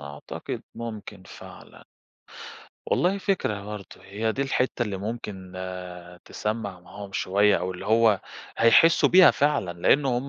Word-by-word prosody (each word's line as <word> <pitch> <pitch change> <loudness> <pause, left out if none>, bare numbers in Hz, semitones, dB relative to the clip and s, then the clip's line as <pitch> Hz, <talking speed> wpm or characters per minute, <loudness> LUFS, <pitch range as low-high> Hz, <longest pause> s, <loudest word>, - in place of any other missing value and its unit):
أعتقد 70 0 -7
ممكن 110 -4 -8
فعلًا. - - -13 1.0
والله 185 +3 +1
فكرة 145 - -1
برضه، 105 -1 -9
هي 110 +3 -2
دي 135 - -1
الحِتّة 130 -2 -1
اللي 105 -4 -3
ممكن 100 -3 -6
آآ 90 -1 -8
تسمّع 105 -4 -4
معاهم 100 +2 -11
شوية، 100 +3 +2
أو 95 +1 -3
اللي 90 - -9
هو 110 -2 +4 0.4
هيحسوا 115 +9 +5
بيها 185 0 +8
فعلًا، 140 -11 0
لإن 140 +9 +3
هُم 125 +1 -1
105 Hz, 135 wpm, -25 LUFS, 95-120 Hz, 1.0 s, بيها